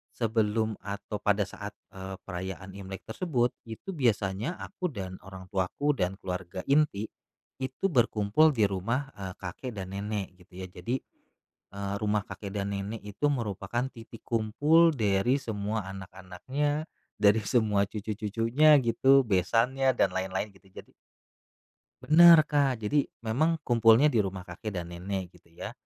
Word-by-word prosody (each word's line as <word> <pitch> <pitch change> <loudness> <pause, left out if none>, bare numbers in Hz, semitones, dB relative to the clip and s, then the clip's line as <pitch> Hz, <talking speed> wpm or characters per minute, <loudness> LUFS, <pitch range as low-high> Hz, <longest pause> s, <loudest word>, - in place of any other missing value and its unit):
sebelum 110 -1 0
atau 100 +1 -6
pada 105 +1 +2
saat, 100 +1 -8 0.2
eee, 95 0 -7
perayaan 95 +1 -6
Imlek 95 0 -8
tersebut, 125 -1 0 0.2
itu 115 - -7
biasanya 115 - 0
aku 185 -2 -4
dan 95 - -6
orang 95 -1 -11
tuaku 100 +10 0
dan 95 -9 -1
keluarga 90 -1 -5
inti, 140 -8 +2 0.6
itu 130 +7 -4
berkumpul 120 +3 +3
di 110 - +3
rumah, 115 +8 -1
eee, 95 -5 -7
kakek 110 +7 -7
dan 95 -2 -6
nenek, 100 -1 -4
gitu 90 +1 -22
ya, 95 - -5
jadi, 90 +8 -3 0.8
eee, 100 0 -4
rumah 105 0 0
kakek 100 0 -7
dan 100 - -3
nenek 105 +3 -5
itu 105 +6 -4
merupakan 115 +1 -2
titik 115 -2 -12
kumpul 145 +9 +3
dari 110 +2 +1
semua 110 -2 -2
anak-anaknya, 95 - -3 0.3
dari 105 +1 +4
semua 100 -2 +1
cucu-cucunya 115 +8 +3
gitu, 135 +3 +4
besannya 115 +7 +2
dan 95 - +2
lain-lain 95 +2 -2
gitu 95 0 -22
jadi - - -13 1.1
Benar, 165 0 +8
Kak, 145 -3 +2
jadi 140 +7 +1 0.2
memang 145 +9 +2
kumpulnya 115 +4 +5
di 115 - +2
rumah 95 -2 -2
kakek 95 +4 -7
dan 85 -1 -5
nenek 90 +1 -4
gitu 90 -1 -22
ya. - - -6
105 Hz, 140 wpm, -28 LUFS, 95-125 Hz, 1.1 s, Benar